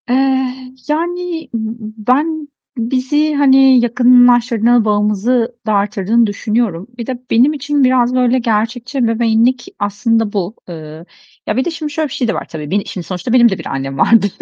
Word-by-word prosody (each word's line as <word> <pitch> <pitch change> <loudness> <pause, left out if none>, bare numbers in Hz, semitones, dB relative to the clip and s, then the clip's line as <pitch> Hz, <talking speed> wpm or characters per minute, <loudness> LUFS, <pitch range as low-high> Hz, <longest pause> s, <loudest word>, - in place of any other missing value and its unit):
Eee, 260 0 0 0.2
yani, 340 +1 -3
b 220 -1 -5 0.2
ben, 310 +2 -2 0.3
bizi, 265 +6 0
hani, 270 -2 +5
yakınlaştırdığı, 240 -1 +4
bağımızı 215 +3 0
da 215 - +1
arttırdığını 205 +3 +1
düşünüyorum. 210 -3 -2
Bir 235 - -5
de 255 -2 -4
benim 255 +6 +4
için 285 0 -1
biraz 255 -1 +2
böyle 255 0 +2
gerçekçi 235 +3 -2
ebeveynlik 235 +1 +1
aslında 210 +1 -1
bu. 200 +1 -3
Eee, 160 -1 -9 0.4
ya, 210 - -1
bir 260 - +1
de 345 - -2
şimdi 310 -2 -5
şöyle 310 +1 -2
bir - - -8
şey 245 - -2
de 220 - 0
var - - -5
tabii. 150 -2 -7
Beni 200 +1 0
şimdi 180 -3 -7
sonuçta 185 +5 -4
benim 240 -2 +6
de 190 - -3
bir - - -9
annem 135 0 -4
vardı. 225 +3 +4
240 Hz, 165 wpm, -15 LUFS, 210-260 Hz, 0.4 s, benim